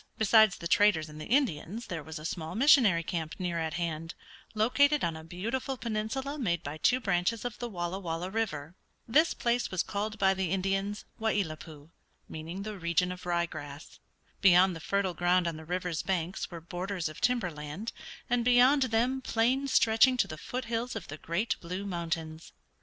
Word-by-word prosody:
Besides 220 -2 +5
the 170 - -4
traders 170 -5 +3
and 150 0 -10
the - - -7
Indians 230 - 0
there 170 -3 -5
was 160 +2 -8
a 155 - -8
small 160 -1 -4
missionary 225 - +5
camp 165 -2 -3
near 175 -3 -2
at 160 0 -2
hand, 165 -1 -3 0.4
located 285 +7 +3
on 165 -2 0
a 160 - -8
beautiful 230 +11 -3
peninsula 235 +6 -3
made 170 - 0
by 145 +2 -5
two 255 +10 +3
branches 200 +1 0
of 230 -3 -4
the 240 - -4
Walla 175 -1 -3
Walla 175 0 -4
River. 175 -9 -2 0.3
This 310 +8 +3
place 240 0 0
was 185 -2 0
called 215 +1 -3
by 195 -2 +4
the 190 -2 -2
Indians 195 +2 -1
Wai 220 0 +1
i 205 - +2
lat 155 -3 -7
pui, 155 -1 -12 0.4
meaning 165 +5 -6
the 210 -2 -6
region 170 +1 +1
of 180 0 -8
rye 170 -1 +1
grass. 145 -2 -9 0.4
Beyond 185 -1 +6
the - - -7
fertile 195 +2 0
ground 175 +1 +2
on 165 - -2
the 160 - -10
river's 180 -1 -2
banks 180 -1 -2
were 170 -2 -8
borders 180 +1 -3
of 155 - -9
timber 240 -8 +1
land, 150 +8 -6 0.3
and 240 0 +1
beyond 250 +4 +5
them 250 +3 +1
plains 260 +3 +1
stretching 230 +3 +5
to - - +2
the 155 - -6
foot 245 +10 -5
hills 230 +1 -2
of 210 -5 -6
the 145 - -6
great 170 +9 -1
Blue 180 +3 -5
Mountains. 165 -3 -4
185 Hz, 190 wpm, -30 LUFS, 165-225 Hz, 0.4 s, Beyond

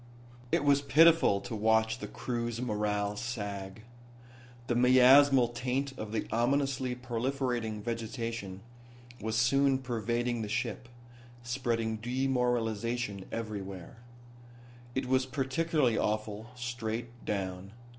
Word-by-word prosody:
It - - +2
was 140 -1 +4
pitiful 155 -8 +5
to 115 - -6
watch 110 +1 +2
the - - -5
crew's 120 -2 -3
morale 105 -3 -1
sag. 105 -3 -5 0.8
The 120 - 0
miasmal 130 +1 +6
taint 130 +3 -2
of 110 -4 -6
the 110 - -2
ominously 130 +1 +1
proliferating 125 -3 -2
vegetation 115 -4 -4 0.6
was 110 +1 -2
soon 135 +4 +3
pervading 120 -1 -2
the 105 - -4
ship, 115 +2 -3 0.5
spreading 120 -2 -1
demoralization 120 -4 -1
everywhere. 100 -4 -6 1.0
It 130 0 -1
was 130 +1 +1
particularly 135 -1 +1
awful 110 0 -2
straight 120 0 -5
down. 95 -1 -3
120 Hz, 105 wpm, -31 LUFS, 110-130 Hz, 1.0 s, miasmal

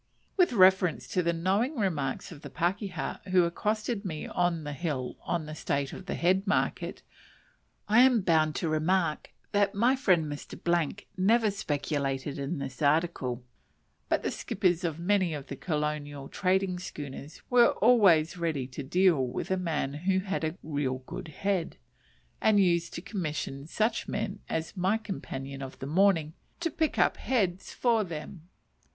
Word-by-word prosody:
With 360 -6 +4
reference 185 -4 +4
to 180 - +1
the 170 -1 +1
knowing 195 - 0
remarks 155 - -1
of 150 -4 -10
the - - -8
pakeha 190 +3 -2
who 185 -1 +5
accosted 210 +5 -1
me 160 -6 -4
on 175 -2 0
the 145 0 -4
hill 140 -5 -3
on 170 -3 -2
the 155 - -7
state 140 -2 -2
of 185 - -9
the - - -2
head 190 +4 +2
market, 200 - -1 0.8
I 220 +3 +6
am 250 -4 +5
bound 160 -4 +2
to 170 - -1
remark 155 +1 +1 0.2
that 205 -1 +2
my 240 +6 +4
friend 185 - +3
Mr. 165 +4 -2 0.2
never 215 +3 +3
speculated 145 -6 -2
in 140 +5 -3
this 135 -2 -6
"article;" 145 -5 +1 0.7
but - - +1
the - - -1
skippers 180 -2 0
of 165 -3 -1
many 180 -1 +1
of 140 -2 -7
the 140 - -4
colonial 150 -2 -3
trading 185 -1 0
schooners 145 -3 -8
were 245 -1 +6
always 185 -9 +4
ready 160 -6 -1
to 130 - -6
deal 170 +1 +3
with 125 +8 -4
a - - +4
man 160 -6 -2
who 185 +6 0
had 195 -2 -3
"a 160 +3 -2
real 140 -4 -2
good - - -7
head," 185 +2 -2 0.6
and 215 -2 +4
used 170 -3 +2
to 170 - -6
commission 155 -9 -4
such 220 +6 0
men 210 -1 -3
as 160 +3 -3
my 190 +4 +2
companion 135 -10 -6
of 135 -1 -7
the - - -6
morning 165 0 +3 0.3
to 335 -1 -1
"pick 315 +1 -1
up - - +3
heads" 190 -8 -1
for 230 -3 +2
them. 165 0 -8
175 Hz, 160 wpm, -29 LUFS, 150-195 Hz, 0.8 s, I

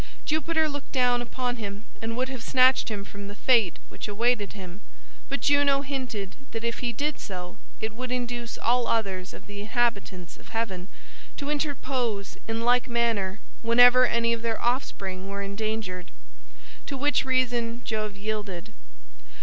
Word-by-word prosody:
Jupiter 315 +1 +2
looked 285 -2 -6
down 245 -2 +3
upon 245 0 -2
him 205 -1 -5 0.2
and 230 +1 -2
would 255 +1 +1
have 260 -2 -5
snatched 255 +1 +5
him 205 -2 -4
from 200 0 -8
the 205 - -7
fate 225 -6 +4
which - - -6
awaited 210 0 +1
him, 190 -1 -9 0.5
but 275 0 -1
Juno 285 -1 +4
hinted 255 -8 -3 0.2
that 225 0 -3
if 235 0 -1
he 245 -1 0
did 290 +5 -1
so 180 -2 -6 0.2
it 220 -1 -2
would 250 +2 -5
induce 240 -1 -2
all 240 0 +2
others 195 -5 0
of - - -11
the 205 0 -7
inhabitants 205 -6 -1
of - - -17
heaven 195 -5 -2 0.5
to 285 0 -2
interpose 260 -8 -1
in 225 0 -1
like 245 +1 +4
manner 225 -5 +1 0.2
whenever 245 +2 +7
any 235 0 +2
of 230 - -2
their 230 -1 -1
offspring 195 -6 -1
were 200 0 -3
endangered; 200 -3 -3 0.8
to 275 - -3
which 290 +2 +2
reason 245 -2 +1
Jove 215 -2 -2
yielded. 205 -4 -4
230 Hz, 160 wpm, -27 LUFS, 205-255 Hz, 0.8 s, whenever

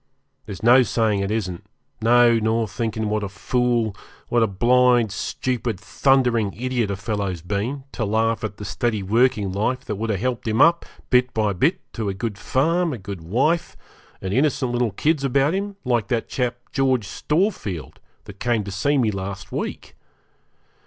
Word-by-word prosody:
There's 100 -2 -8
no 120 +3 +7
saying 110 -4 +1
it 100 0 -1
isn't; 95 -5 -3 0.4
no, 120 0 +5
nor 110 +1 +1
thinking 110 0 -3
what 105 0 0
a 100 - -3
fool, 120 +1 0 0.3
what 120 - +2
a 115 - +4
blind, 120 +2 +3
stupid, 115 0 -2
thundering 120 -3 +2
idiot 125 -1 -1
a 100 - -1
fellow's 100 -5 -3
been, 105 +9 -3
to 115 - -3
laugh 110 +2 0
at 105 -2 -4
the 105 - -7
steady 110 0 -1
working 110 -1 +2
life 110 +7 -1
that 105 - -4
would 110 +2 -3
have 100 -4 0
helped 125 0 -2
him 110 +1 0
up, 170 0 +4 0.2
bit 125 0 +4
by 105 -2 +1
bit, 140 - +1
to 110 -4 -2
a 95 - -3
good 100 0 -4
farm, 165 +4 +1
a - - -4
good 100 -3 -7
wife, 130 - 0 0.5
and 95 0 -2
innocent 130 -1 +1
little 120 -1 +1
kids 150 - 0
about 140 +3 +2
him, 200 +1 -3
like 120 -4 +1
that 120 -3 -1
chap, 125 -2 -2
George 130 -5 +1
Storefield, 150 - -2 0.2
that 100 -1 -12
came 120 -3 +1
to 100 - -6
see 140 +10 +1
me 115 -5 +2
last 95 -1 -6
week. - - -5
115 Hz, 175 wpm, -22 LUFS, 100-125 Hz, 0.5 s, no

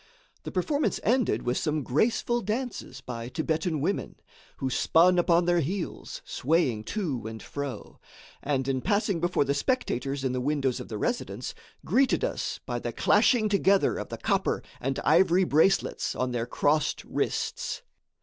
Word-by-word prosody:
The - - -4
performance 295 -1 0
ended 250 +1 +2
with 125 +1 0
some 155 -2 -1
graceful 230 - +1
dances 235 +3 -4
by 120 -1 -6
Thibetan 160 +1 -1
women, 195 +7 -2 0.4
who 135 - -2
spun 175 +7 +4
upon 170 0 +3
their 175 0 +3
heels, 170 +4 -4
swaying 130 -7 0
to 140 - -3
and 110 0 -7
fro, 140 -6 -6 0.4
and, 135 -2 -1
in 130 -1 0
passing 200 - +1
before 175 -3 +1
the 140 - +1
spectators 140 - -1
in 130 - 0
the 125 0 -2
windows 135 -2 0
of - - -7
the 110 - -5
residence, 240 - -3 0.3
greeted 270 0 +2
us - - -2
by - - -2
the - - -4
clashing 230 -4 +3
together 200 -1 +3
of - - -6
the - - -5
copper - - 0 0.2
and 135 +1 -2
ivory 175 +3 +4
bracelets 165 +3 +2
on 130 0 -1
their 120 -1 -2
crossed 150 +4 +1
wrists. - - -2
155 Hz, 155 wpm, -27 LUFS, 130-200 Hz, 0.4 s, spun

